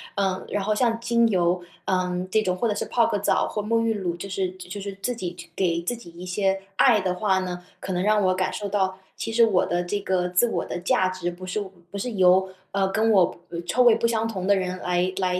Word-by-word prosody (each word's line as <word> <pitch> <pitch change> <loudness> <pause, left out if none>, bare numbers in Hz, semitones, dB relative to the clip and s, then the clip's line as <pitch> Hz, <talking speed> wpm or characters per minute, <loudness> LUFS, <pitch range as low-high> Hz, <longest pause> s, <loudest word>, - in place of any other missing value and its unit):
呃， 190 -1 -1
然 205 - -1
后 215 +2 +1
像 230 0 +1
精 235 0 +3
油， 180 -2 +2 0.2
呃， 180 -1 -1
这 220 +3 +3
种 185 -3 0
或 235 +6 0
者 210 - 0
是 - - -2
泡 235 -2 +2
个 - - 0
澡 205 - +1
或 210 - -3
沐 230 +2 +1
浴 230 0 +1
乳， 185 -5 -2
就 185 +3 -7
是 185 -1 -1
就 185 +1 -8
是 200 0 -5
自 245 +4 -1
己 180 -6 -5 0.2
给 170 -3 +1
自 210 +8 -2
己 175 -7 -13
一 175 +2 -10
些 195 +1 0
爱 225 -1 +5
的 185 -1 -1
话 190 -1 +2
呢， 180 -1 -5
可 190 - -5
能 180 0 0
让 210 +1 +3
我 185 0 +3
感 185 0 -1
受 205 -2 -4
到， 190 -1 0 0.2
其 225 - -4
实 230 +1 +5
我 200 -5 +2
的 175 0 0
这 200 +4 -2
个 185 -2 0
自 180 +7 +3
我 - - -1
的 - - -5
价 185 +1 +2
值 185 -1 -3
不 180 +2 -9
是 185 +3 -2 0.3
不 200 - -5
是 245 +5 -3
由， 190 -2 +4 0.2
呃， 195 -1 +1
跟 220 +2 +2
我 190 -4 +4 0.3
臭 250 +7 +3
味 240 -2 +7
不 230 +1 -1
相 225 -1 0
同 190 -5 -4
的 200 +1 +4
人 185 -1 -2
来 180 +1 0
来 180 -1 0
190 Hz, 270 characters per minute, -24 LUFS, 180-215 Hz, 0.3 s, 味